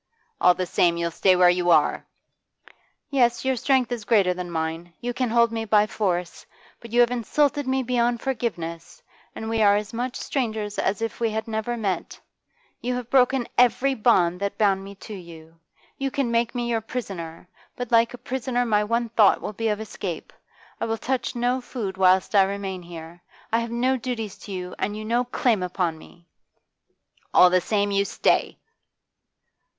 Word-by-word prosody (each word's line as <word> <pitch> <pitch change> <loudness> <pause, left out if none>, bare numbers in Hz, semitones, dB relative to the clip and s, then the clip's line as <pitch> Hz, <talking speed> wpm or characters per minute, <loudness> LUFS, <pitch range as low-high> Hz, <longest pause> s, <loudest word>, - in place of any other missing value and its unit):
'All 180 - +6
the 185 - -2
same, 170 -1 +2
you'll 170 0 -1
stay 185 +2 +3
where 180 0 +5
you 175 0 0
are!' 170 - +3 1.0
'Yes, 240 -3 +2
your 265 0 +2
strength 255 0 +1
is 235 -3 -3
greater 200 -4 +3
than 180 0 -6
mine. 165 +1 -4
You 245 0 -3
can 250 -1 -1
hold 235 0 +3
me 225 -1 -2
by 210 -1 +4
force. 180 -5 -2 0.4
But 230 - -12
you 240 +1 +4
have 240 0 +4
insulted 285 +4 0
me 265 0 +1
beyond 240 -1 +1
forgiveness, 220 - -4 0.3
and 220 - -6
we 225 0 0
are 205 -1 +5
as 210 +2 -3
much 245 +2 -3
strangers 220 -6 -3
as 195 +3 -1
if 225 - -4
we 230 -1 +1
had 220 +1 -3
never 225 +2 -2
met. 200 -5 -3 0.6
You 250 +1 -2
have 245 -1 -6
broken 255 -1 +3
every 250 +2 +4
bond 185 -7 +2
that 200 0 -3
bound 195 -3 +2
me 200 +1 -10
to 215 +2 -10
you. 165 -3 -12 0.4
You 275 0 -1
can 265 -3 -1
make 235 +1 0
me 240 -1 -1
your 230 -1 0
prisoner, 185 -9 -6 0.3
but 245 -1 -6
like 230 +1 +3
a - - -12
prisoner 245 0 -2
my 210 -2 +2
one 230 +2 -1
thought 215 -3 +4
will - - -5
be 225 +2 -2
of 210 -1 0
escape. 195 -6 -6 0.5
I - - -1
will 225 0 -2
touch 260 +2 -2
no 245 +2 0
food 225 -6 -5
whilst 190 +1 +3
I 200 - +6
remain 195 -1 -2
here. 170 0 -10 0.3
I 230 - +4
have 230 0 -3
no 250 +3 +1
duties 225 -4 -4
to 205 - -10
you, 180 -1 -5
and 205 +2 -2
you 215 - -6
no 240 +3 +1
claim 240 -4 +1
upon 180 -3 -2
me!' 170 +2 -17 1.1
'All 180 - +7
the 185 0 +3
same, 205 0 0
you 200 0 +2
stay! - - 0
220 Hz, 185 wpm, -24 LUFS, 185-240 Hz, 1.1 s, All